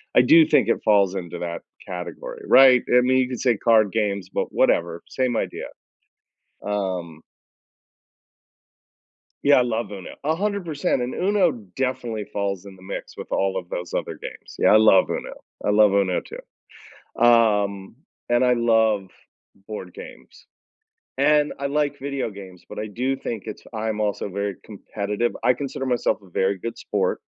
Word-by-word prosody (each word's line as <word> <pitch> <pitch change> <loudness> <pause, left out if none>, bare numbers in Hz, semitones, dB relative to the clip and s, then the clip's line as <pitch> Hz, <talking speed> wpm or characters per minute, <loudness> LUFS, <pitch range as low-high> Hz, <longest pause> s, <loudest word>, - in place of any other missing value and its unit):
I 125 - +7
do 160 +5 +6
think - - +3
it 115 - +1
falls 100 -3 +3
into 85 -3 -5
that 85 -1 -5 0.3
category, 475 - -7
right, 130 -2 +7 0.2
I - - +6
mean, 130 +1 +2
you 130 -1 +2
can 125 -1 -5
say 125 -2 +2
card 110 -1 +3
games, 100 -4 -1
but - - -1
whatever, 85 0 +1
same 130 -3 -1
idea. - - -3 1.0
Um 90 -6 -3 2.2
Yeah, 145 0 +6
I - - +5
love 115 -3 -2
UNO. 95 -3 -8
100% 165 -4 -1
and 125 +1 -3
UNO 190 -2 +2 0.2
definitely 125 -5 -2
falls 100 -2 -3
in 100 -1 -11
the 95 - -18
mix 95 - -7
with - - -9
all 95 0 0
of 90 -2 -6
those 90 -1 -5
other - - -3
games. - - -9
Yeah, - - +4
I - - +8
love 110 -4 +5
UNO. - - -5 0.2
I - - +1
love 105 -1 +5
UNO 95 -3 +1
too. - - -13 0.6
Um, 105 -4 +3 0.3
and 120 +1 +3
I 125 - +4
love 110 -4 +2 0.6
board 95 -4 -7
games. - - -13 0.7
And 150 -1 +3
I 140 - -1
like 145 0 -1
video 140 -3 -3
games, 95 -3 -12
but - - -9
I 105 - -3
do 130 +5 -1
think 115 -5 -5
it's - - -7
I 110 0 -3
am 110 -1 -2
also 105 -1 -1
very 100 0 -3
competitive. 105 +2 -3
I 125 - +4
consider 135 0 -5
myself 125 -2 0
a 95 - -17
very 95 +2 0
good 115 +5 -6
sport - - -1
110 Hz, 165 wpm, -23 LUFS, 100-130 Hz, 2.2 s, I